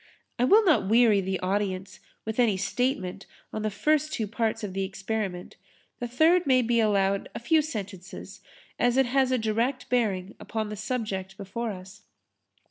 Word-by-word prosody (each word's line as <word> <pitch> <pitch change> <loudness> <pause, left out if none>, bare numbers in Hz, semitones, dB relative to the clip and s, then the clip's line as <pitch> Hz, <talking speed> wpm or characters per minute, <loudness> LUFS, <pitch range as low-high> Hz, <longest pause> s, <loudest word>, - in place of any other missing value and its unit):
I 245 - +4
will 425 +10 +6
not 305 - +3
weary 225 -3 +5
the 190 0 -2
audience 190 0 -2 0.3
with 220 +2 -4
any 225 -6 +3
statement 200 -1 -2 0.3
on 215 - -3
the 215 - 0
first 305 +8 +1
two 230 -8 -1
parts 225 +1 -2
of 200 -3 -4
the 195 0 -1
experiment. 190 -1 -4 0.4
The 245 - -3
third 320 +7 +3
may 255 -2 +4
be 235 0 +2
allowed 200 -2 +1
a - - -3
few 310 +7 +3
sentences 205 - -7 0.4
as 245 +1 +2
it 270 - +5
has 260 +1 +2
a 255 - +3
direct 235 +4 -1
bearing 210 -6 0
upon 220 -2 -4
the 210 - -5
subject 200 -4 -4
before 215 +4 -4
us. 190 +1 -11
220 Hz, 170 wpm, -27 LUFS, 195-250 Hz, 0.4 s, will